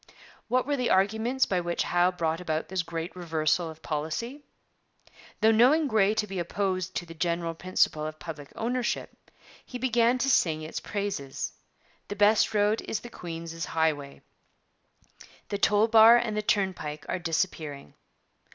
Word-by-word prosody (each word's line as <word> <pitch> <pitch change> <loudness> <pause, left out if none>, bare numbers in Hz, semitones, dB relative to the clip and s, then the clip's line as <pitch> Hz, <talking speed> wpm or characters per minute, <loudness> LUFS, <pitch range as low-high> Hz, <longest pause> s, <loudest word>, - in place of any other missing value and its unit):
' - - -26
What 255 0 +1
were 285 0 0
the 250 -2 0
arguments 220 +7 +2
by 185 -2 0
which 170 0 -1
Howe 175 +1 +2
brought 165 -2 -2
about 160 -2 -2
this 190 -1 0
great 165 +1 -5
reversal 165 -1 0
of 160 0 -12
policy? 160 - -4 1.0
Though 220 - +6
knowing 265 +8 +4
Grey 215 -3 +3
to 220 -1 0
be 195 -2 -5
opposed 185 +1 -2
to 175 - -2
the 165 - -10
general 170 0 -1
principle 160 -3 0
of 155 0 -7
public 155 -4 -8
ownership, 245 +2 -2 0.5
he 250 - -7
began 240 -1 +2
by 250 - -1
singing 160 -12 +2
its - - -5
praises. 200 -10 -4 0.5
The 205 - -5
best 210 +1 +3
road 210 +1 +2
is 215 - -2
the 240 - -9
queen's 165 -1 -7
highway. 150 -3 -1 1.3
The 200 - -2
toll 210 +2 +4
bar 225 +1 +8
and 230 -3 -1
the 215 - 0
turn 200 -2 +1
pike 150 -2 -7
are - - -2
disappearing. 160 - -3
185 Hz, 160 wpm, -27 LUFS, 165-220 Hz, 1.3 s, bar